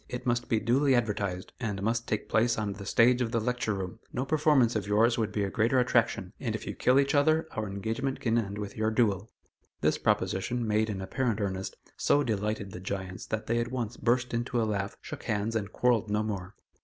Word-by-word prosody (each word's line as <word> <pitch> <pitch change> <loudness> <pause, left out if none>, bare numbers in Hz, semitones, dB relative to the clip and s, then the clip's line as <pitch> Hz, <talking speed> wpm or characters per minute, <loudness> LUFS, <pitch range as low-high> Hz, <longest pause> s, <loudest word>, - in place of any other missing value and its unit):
It 125 0 -5
must 120 -1 0
be 110 - +3
duly 130 +5 +3
advertised, 100 -6 -1
and 105 -5 -3
must 115 +2 0
take 105 - -2
place 115 +1 +2
on 105 -2 -1
the 100 0 -9
stage 125 +2 +4
of 115 -2 0
the 115 - +1
Lecture 120 -1 -1
Room. 95 -2 -5
No 130 +1 -2
performance 145 -5 +3
of 100 -2 -1
yours 115 +3 +4
would 110 -2 0
be 105 0 -1
a 100 - -2
greater 115 +4 +2
attraction, 115 -6 +1
and 115 -5 -2
if - - -6
you - - -4
kill 130 +2 +3
each 140 +1 +2
other, 155 +3 +3
our 110 -1 -3
engagement 115 +7 -2
can 115 -2 0
end 100 -3 -1
with 105 -1 -5
your 110 0 +1
duel." 110 -3 +1 0.5
This - - +2
proposition, 115 +5 0
made 110 +1 +2
in 100 -2 -3
apparent 115 +3 -1
earnest, 95 -2 -3 0.2
so 145 - +3
delighted 105 -3 -2
the 90 - -7
giants 95 0 -5
that 110 0 -3
they 115 +1 +1
at 120 0 -1
once 120 -3 -3
burst 120 +2 +1
into 120 +1 -1
a 115 - +2
laugh, 100 -2 -2
shook - - -8
hands, 105 +2 -1
and 105 -2 -2
quarrelled 115 -4 +2
no 105 +1 +1
more. 100 -2 -4
110 Hz, 220 wpm, -29 LUFS, 100-120 Hz, 0.5 s, stage